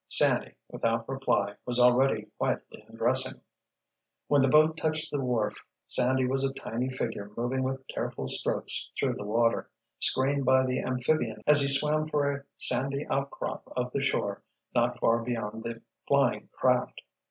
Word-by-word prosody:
Sandy, - - +2
without 115 0 -2
reply, 130 -7 -1
was 125 0 +1
already 125 +2 +3
quietly - - -3
undressing. - - +2 0.9
When 145 -1 +3
the 135 - +3
boat 155 +3 +4
touched 155 0 -2
the 145 - -2
wharf 120 -5 -2 0.2
Sandy 130 +1 +3
was 135 +1 0
a 135 0 -1
tiny 125 +2 -4
figure 115 -5 -4
moving 125 +3 -1
with 130 0 -3
careful - - -5
strokes - - 0
through - - +1
the - - -7
water, 115 +2 0 0.3
screened 140 +1 +1
by 130 0 +4
the 130 0 -1
amphibian 125 -4 -1
as 150 -1 +6
he 140 - +2
swam 150 +2 +2
for 145 -2 0
a 140 0 -6
sandy 140 +3 +4
outcrop 140 0 -4
of 125 0 -2
the 140 - -1
shore 100 -7 -1 0.3
not - - +1
far 115 +1 +2
beyond 115 -2 -4
the 115 0 -7 0.2
flying - - +1
craft. - - 0
130 Hz, 155 wpm, -28 LUFS, 120-140 Hz, 0.9 s, as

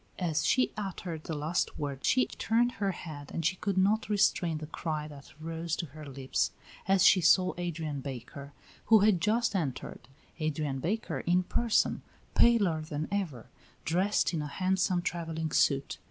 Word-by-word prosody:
As 170 -4 0
she 255 - +3
uttered 180 -6 -5
the 160 - -3
last 155 +4 -1
word 140 -2 -4
she 255 - +3
turned 240 +2 +1
her 200 -4 -2
head 155 -5 -8
and 165 - -3
she 180 +3 +2
could 195 0 -2
not 205 +4 +2
restrain 180 -5 +2
the 155 - -6
cry 155 -1 -4
that 145 -2 -12
rose 165 +1 -3
to 170 - -3
her 155 0 -11
lips 135 -1 -1 0.4
as 190 -1 +4
she 185 - +7
saw 185 +2 +4
Adrian 160 -5 -3
Baker, 140 +1 -8 0.3
who 220 -2 +6
had 205 -5 +4
just 220 +2 +1
entered 145 -9 -3 0.3
Adrian 150 -3 -2
Baker, 175 - -2
in 180 +5 +2
person, 235 +4 +1 0.3
paler 200 -10 +4
than 155 0 -4
ever, 170 - -3 0.3
dressed 185 +4 +1
in 160 - -1
a 150 - -4
handsome 185 +2 0
travelling 160 -3 -3
suit. 140 0 +1
165 Hz, 165 wpm, -30 LUFS, 150-195 Hz, 0.4 s, she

